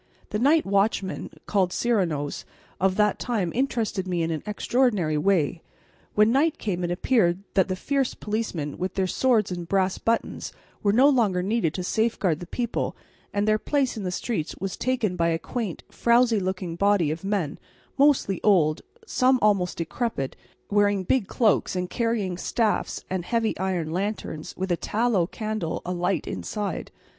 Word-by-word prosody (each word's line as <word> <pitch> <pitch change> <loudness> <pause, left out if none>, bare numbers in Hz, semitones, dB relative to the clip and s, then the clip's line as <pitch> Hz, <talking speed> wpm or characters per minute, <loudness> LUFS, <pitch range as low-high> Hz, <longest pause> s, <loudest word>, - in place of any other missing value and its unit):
The 210 - -1
night 300 +6 +4
watchmen, 195 -1 0 0.2
called 190 -3 +1
Serenos, 175 -13 0 0.4
of 190 0 +2
that 210 0 +2
time 205 -8 -1
interested 230 -7 -1
me 175 -2 0
in 165 - -1
an 155 - -2
extraordinary 210 -6 +1
way. 165 -1 +1 0.5
When 215 +1 +5
night 300 +5 +2
came 180 -4 -2
it 175 - -1
appeared 175 -1 +2
that 190 -3 +3
the 185 - -1
fierce 270 +6 -1
policemen, 210 -9 -3
with 185 +1 -3
their 190 - +1
swords 220 +1 +2
and 175 -1 -4
brass 190 0 +1
buttons, 230 0 -1 0.3
were 205 - +3
no 255 +7 +6
longer 215 -10 +2
needed 195 -5 0
to 185 - -3
safeguard 195 -5 +1
the 175 - -8
people, 240 +4 -2 0.4
and 205 +1 0
their 215 0 +3
place 275 -1 0
in 220 - -5
the 185 - -2
streets 180 -2 -3
was 190 0 -3
taken 240 -7 0
by 170 -1 +1
a 165 - +1
quaint, 215 0 -4
frowsy 235 -2 +3
looking 185 -2 -3
body 200 -4 +3
of 160 +3 -5
men, 195 -7 -1 0.4
mostly 275 - +3
old, 165 -7 +4 0.2
some 260 -9 +3
almost 200 -5 +2
decrepit, 165 - -2 0.4
wearing 205 -1 +3
big 210 +2 +1
cloaks 215 -5 +2
and 180 0 -2
carrying 220 -7 -1
staffs 220 +1 -1
and 185 -2 -2
heavy 230 +3 0
iron 180 -4 -1
lanterns 185 -4 -3
with 190 0 -2
a 175 - +2
tallow 215 -5 +1
candle 215 -5 -3
alight 180 +1 -1
inside. 205 -5 -4
200 Hz, 165 wpm, -25 LUFS, 180-230 Hz, 0.5 s, no